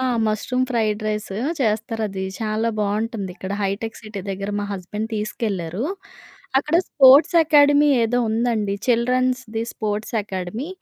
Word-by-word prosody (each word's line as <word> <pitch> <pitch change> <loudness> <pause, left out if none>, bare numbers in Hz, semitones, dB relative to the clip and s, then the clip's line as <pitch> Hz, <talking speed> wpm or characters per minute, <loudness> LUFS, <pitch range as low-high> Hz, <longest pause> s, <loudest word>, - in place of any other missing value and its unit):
ఆ! - - -1 0.2
Mushroom 250 +4 0
fried 215 -3 0
rice 210 -2 -3 0.3
చేస్తారది. 215 -3 -1 0.2
చాలా 220 +1 0
బాగుంటుందిక్కడ 205 -2 -3
hitech 200 +3 -3
city 215 -2 -7
దగ్గర 195 +1 -4
మా - - -2
హస్బెండ్ 205 +3 -5
తీసుకెళ్లారు. 210 -2 -3 0.7
అక్కడ 300 +4 +1
స్పోర్ట్స్ 280 +4 +6
అకాడమీ 290 -1 +5 0.2
ఏదో 245 +2 +1
ఉందండి 220 -3 0
చిల్డ్రన్స్‌ది 250 -1 +1
స్పోర్ట్స్ 215 +1 -3
అకాడమీ 190 - -5
220 Hz, 115 wpm, -22 LUFS, 205-245 Hz, 0.7 s, స్పోర్ట్స్